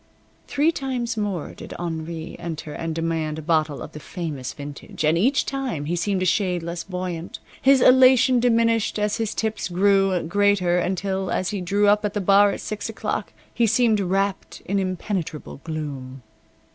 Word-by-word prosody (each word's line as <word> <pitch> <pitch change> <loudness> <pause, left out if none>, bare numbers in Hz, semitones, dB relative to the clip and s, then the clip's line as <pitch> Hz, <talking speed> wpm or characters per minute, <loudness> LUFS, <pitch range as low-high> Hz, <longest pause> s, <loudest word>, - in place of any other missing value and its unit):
Three 295 +3 +2
times 255 -6 -3
more 205 -7 -3
did - - -9
Henri 165 -1 -5
enter 160 -2 -6
and 165 0 -4
demand 165 -2 -1
a - - -5
bottle 155 -2 0
of - - -9
the 150 - -9
famous 150 -6 -5
vintage, 145 +1 -6
and 155 +2 +4
each 250 +12 +2
time 260 - -3
he 170 +4 -1
seemed 185 +2 0
a - - 0
shade 180 -1 +1
less 170 0 -4
buoyant. 180 -3 -5 0.2
His 270 -1 +5
elation 255 0 +6
diminished 230 -2 +2
as 210 0 0
his 225 -2 -2
tips 220 -1 -2
grew 195 0 +3
greater 185 0 +2
until, 190 +1 -1
as 185 - -1
he 200 -3 -3
drew 200 +3 +2
up 210 +1 +4
at 210 0 -2
the - - +1
bar 200 +1 +5
at - - -4
six 215 +1 -4
o'clock, 210 -4 -3 0.2
he 235 -1 +2
seemed 225 -1 +3
wrapped 195 +1 -1
in 200 +1 0
impenetrable 185 -6 -4
gloom. 140 -5 -6
190 Hz, 170 wpm, -23 LUFS, 165-215 Hz, 0.2 s, elation